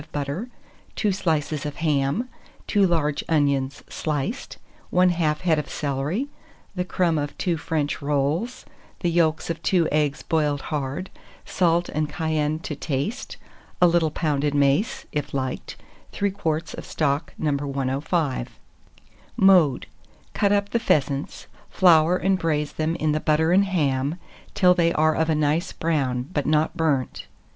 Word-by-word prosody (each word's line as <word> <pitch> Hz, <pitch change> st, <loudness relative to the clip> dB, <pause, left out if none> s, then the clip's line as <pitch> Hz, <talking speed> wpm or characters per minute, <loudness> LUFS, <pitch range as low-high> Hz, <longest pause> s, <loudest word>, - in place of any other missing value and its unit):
of 150 Hz, -, -17 dB
butter, 145 Hz, -, -3 dB, 0.5 s
2 210 Hz, -, +1 dB
slices 155 Hz, -5 st, -1 dB
of 145 Hz, -1 st, -4 dB
ham, 150 Hz, -, 0 dB, 0.4 s
2 200 Hz, -2 st, +3 dB
large 150 Hz, -4 st, 0 dB
onions 140 Hz, -3 st, +1 dB
sliced, 155 Hz, -, -3 dB, 0.3 s
1/2 175 Hz, -4 st, +3 dB
head 165 Hz, -4 st, +2 dB
of 150 Hz, -, -5 dB
celery, 145 Hz, -, -2 dB, 0.5 s
the 180 Hz, -2 st, -1 dB
crumb 175 Hz, -3 st, +1 dB
of 145 Hz, 0 st, -4 dB
two 175 Hz, -3 st, 0 dB
French 155 Hz, -1 st, -2 dB
rolls, 145 Hz, -, -1 dB, 0.4 s
the 175 Hz, -, +1 dB
yolks 165 Hz, -1 st, +1 dB
of 165 Hz, 0 st, -6 dB
2 170 Hz, -2 st, +2 dB
eggs 150 Hz, -2 st, 0 dB
boiled 150 Hz, -4 st, 0 dB
hard, 145 Hz, +5 st, -3 dB, 0.3 s
salt 175 Hz, -1 st, +1 dB
and 155 Hz, 0 st, -1 dB
cayenne 155 Hz, -1 st, -1 dB
to 160 Hz, -2 st, -6 dB
taste, 150 Hz, -, -3 dB, 0.4 s
a 180 Hz, -, +6 dB
little 170 Hz, -2 st, +3 dB
pounded 145 Hz, -2 st, -1 dB
mace, 140 Hz, +9 st, +1 dB
if 150 Hz, -1 st, -3 dB
liked; 130 Hz, -1 st, -3 dB, 0.4 s
3 200 Hz, 0 st, 0 dB
quarts 165 Hz, -4 st, -2 dB
of -, -, -7 dB
stock 145 Hz, +1 st, -1 dB
No. 155 Hz, -2 st, 0 dB
105. 140 Hz, 0 st, -2 dB, 0.8 s
Mode. 180 Hz, -9 st, +5 dB, 0.5 s
Cut 200 Hz, -2 st, +2 dB
up 200 Hz, 0 st, +1 dB
the 235 Hz, -, +2 dB
pheasants, 140 Hz, -, 0 dB, 0.2 s
flour 175 Hz, -1 st, +5 dB
and 190 Hz, 0 st, +1 dB
braise 150 Hz, -3 st, 0 dB
them 160 Hz, +1 st, -1 dB
in 155 Hz, -2 st, 0 dB
the 155 Hz, -, +1 dB
butter 155 Hz, +2 st, +2 dB
and 195 Hz, +2 st, +5 dB
ham 145 Hz, -5 st, 0 dB, 0.4 s
till 180 Hz, -2 st, +5 dB
they 170 Hz, -2 st, +2 dB
are 155 Hz, +1 st, +3 dB
of 160 Hz, +1 st, 0 dB
a 160 Hz, -, +3 dB
nice 155 Hz, +3 st, +1 dB
brown, 135 Hz, -7 st, -1 dB
but 145 Hz, -, -1 dB
not 155 Hz, +2 st, +2 dB
burnt. 150 Hz, -6 st, -1 dB
155 Hz, 150 wpm, -24 LUFS, 145-175 Hz, 0.8 s, a